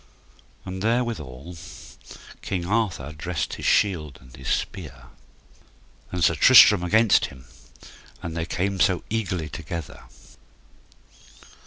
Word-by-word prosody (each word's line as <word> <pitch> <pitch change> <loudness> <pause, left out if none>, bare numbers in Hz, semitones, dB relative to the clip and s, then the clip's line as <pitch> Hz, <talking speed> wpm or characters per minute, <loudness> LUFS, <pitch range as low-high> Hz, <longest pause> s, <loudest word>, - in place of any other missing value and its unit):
And 95 0 -6
there 115 +4 +2
withal 80 - -7 0.9
King 90 -3 -3
Arthur 95 - -1
dressed 85 +3 -3
his - - -4
shield 80 -9 +1
and 65 0 -16
his 65 - -10
spear, 75 -9 -4 1.0
and 90 -1 -2
Sir 85 - +4
Tristram 105 +2 +7
against 110 +4 +4
him, 65 -2 -14 0.7
and 85 -1 -6
they 85 0 -3
came 95 +2 -2
so 90 -1 +2
eagerly 95 -7 -2
together. 80 -1 -7
90 Hz, 115 wpm, -24 LUFS, 75-100 Hz, 1.0 s, Tristram